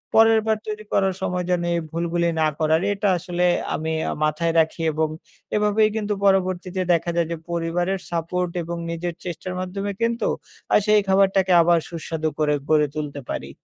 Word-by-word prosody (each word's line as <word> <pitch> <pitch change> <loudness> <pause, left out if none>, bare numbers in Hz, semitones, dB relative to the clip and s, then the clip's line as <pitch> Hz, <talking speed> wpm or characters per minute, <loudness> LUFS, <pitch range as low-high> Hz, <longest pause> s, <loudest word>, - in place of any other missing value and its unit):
পরেরবার 225 -1 +5
তৈরি 215 0 -4
করার 195 -1 +2
সময় 180 0 -1
যেন 175 -1 +2
এই 170 - +1
ভুলগুলি 170 +1 0
না - - +4
করার 160 +1 +3
এটা 200 +1 -1
আসলে 175 0 -2 0.3
আমি 160 +1 -3 0.2
আ - - -1
মাথায় 160 +2 +1
রাখি 160 +1 +1
এবং 155 0 0 0.5
এভাবেই 210 +1 +3
কিন্তু 210 -1 -1
পরবর্তীতে 185 -1 +1
দেখা 170 0 0
যায় 170 -1 +2
যে, 170 - -2
পরিবারের 175 +3 -1
support 170 +1 -1
এবং 170 +1 -5
নিজের 170 +1 -3
চেষ্টার 180 +1 -5
মাধ্যমে 195 +2 -3
কিন্তু, 230 +1 0 0.5
আ - - +7
সেই 210 0 +5
খাবারটাকে 190 -1 +3
আবার 170 0 +4
সুস্বাদু 160 -1 -3
করে 150 -1 +2 0.2
গড়ে 150 -1 +4
তুলতে 150 -2 -4
পারি। - - -4
175 Hz, 165 wpm, -23 LUFS, 165-195 Hz, 0.5 s, আ